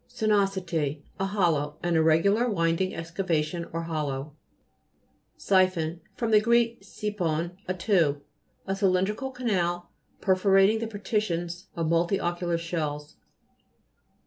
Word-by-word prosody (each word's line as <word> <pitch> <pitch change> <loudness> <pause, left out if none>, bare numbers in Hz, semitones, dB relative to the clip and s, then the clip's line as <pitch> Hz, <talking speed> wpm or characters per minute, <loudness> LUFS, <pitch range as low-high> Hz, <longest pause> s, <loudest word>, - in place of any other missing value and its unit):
SINUO'SITT 190 - 0 0.2
A 195 - +1
hollow, 165 -7 0
an 175 -1 +1
irregular, 165 +9 +3
winding 170 -1 0
excavation 165 -1 -2
or 165 +1 -3
hollow. 150 -3 -3 1.0
SI'PHOW 185 -4 +2 0.2
fr. 235 - -2
gr. 235 +3 +3 0.3
siphon, 180 -5 -3
a 185 - -1
tube. 170 -7 +1 0.4
A 195 - -1
cylindrical 195 +6 +1
canal, 180 -9 -1 0.3
perforating 195 +2 +4
the 230 - -3
partitions 190 -4 -2
of 165 -2 -1
multilocular 175 +1 0
shells. 155 -3 -4
175 Hz, 100 wpm, -27 LUFS, 165-195 Hz, 1.0 s, perforating